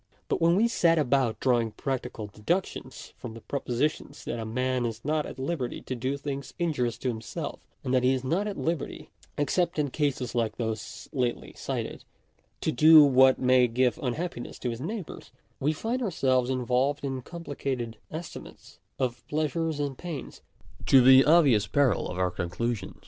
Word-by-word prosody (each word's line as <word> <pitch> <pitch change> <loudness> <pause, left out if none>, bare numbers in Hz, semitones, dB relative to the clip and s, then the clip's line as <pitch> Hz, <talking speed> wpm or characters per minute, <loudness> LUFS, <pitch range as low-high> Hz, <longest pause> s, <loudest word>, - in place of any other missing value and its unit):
But - - 0
when 170 +1 +5
we 220 +5 +4
set 170 -7 +3
about 135 -5 +1
drawing 120 -3 +2
practical 125 -3 -4
deductions 130 - -3
from 115 -3 -8
the 115 - -10
propositions 140 +3 -2
that - - -3
a 110 - -4
man 125 +2 -1
is 115 0 -4
not 150 0 0
at - - -9
liberty 135 -2 -3
to - - -5
do 130 +4 -2
things 140 -1 -6
injurious 130 -9 0
to - - -4
himself, 110 -1 -5 0.2
and 130 - -2
that 130 - +4
he 125 +1 +3
is 130 -1 -1
not 175 +10 0
at 205 - -4
liberty 165 -2 -3 0.3
(except 170 +4 +1
in 145 -3 0
cases 135 -5 -1
like 115 -2 0
those 110 -1 -4
lately 125 -4 -2
cited) - - -4 0.6
to - - +1
do 155 +4 +8
what 130 -2 +6
may 125 -1 +4
give 125 +1 +1
unhappiness 135 0 -4
to 125 - -3
his 115 +1 -6
neighbours, 195 +3 -6 0.3
we 145 +3 +2
find 225 - -2
ourselves 130 - +1
involved 130 +3 0
in 135 -2 -3
complicated 135 -7 -5
estimates 160 0 -9 0.2
of 125 -2 -2
pleasures 155 +1 -1
and 140 -3 -3
pains, 170 -6 -7 0.5
to 135 - +7
the 130 +1 +8
obvious 145 -10 +5
peril 140 -8 +2
of 90 - -5
our 90 -1 +1
conclusions. 95 +4 -3
130 Hz, 170 wpm, -27 LUFS, 120-155 Hz, 0.6 s, do